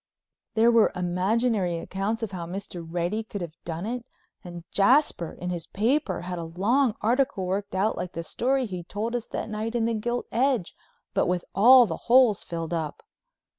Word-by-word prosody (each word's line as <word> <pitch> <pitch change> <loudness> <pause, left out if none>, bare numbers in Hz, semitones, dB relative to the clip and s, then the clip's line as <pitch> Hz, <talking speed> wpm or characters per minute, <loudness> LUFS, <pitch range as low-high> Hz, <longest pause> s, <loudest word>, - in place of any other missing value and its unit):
There 230 +2 +5
were 230 -2 +5
imaginary 185 +1 0
accounts 200 +6 -3
of 215 - -3
how 175 -3 -5
Mr. 180 -1 -6
Reddy 175 +6 -2
could 210 -3 -7
have 170 -3 -5
done 170 +2 -4
it, 245 +2 -3 0.4
and 175 -1 -8
Jasper, 200 - +3
in 180 0 -5
his 170 -1 -4
paper, 255 +9 0
had 180 0 -5
a - - -4
long 210 +9 +1
article 245 -3 +1
worked 195 +2 -3
out 200 +4 +1
like 180 - -4
the 165 - -4
story 260 +8 0
he'd 180 -5 -7
told 220 +3 -3
us 240 - -3
that - - -4
night 220 +2 -4
in 230 -1 +1
the 230 - 0
Gilt 240 +3 -2
Edge, 250 -6 +1 0.4
but - - +2
with 180 0 -1
all 245 +5 +8
the 165 -6 -4
holes 245 -4 +5
filled 165 0 -4
up. 160 -3 -3
200 Hz, 185 wpm, -26 LUFS, 175-235 Hz, 0.4 s, all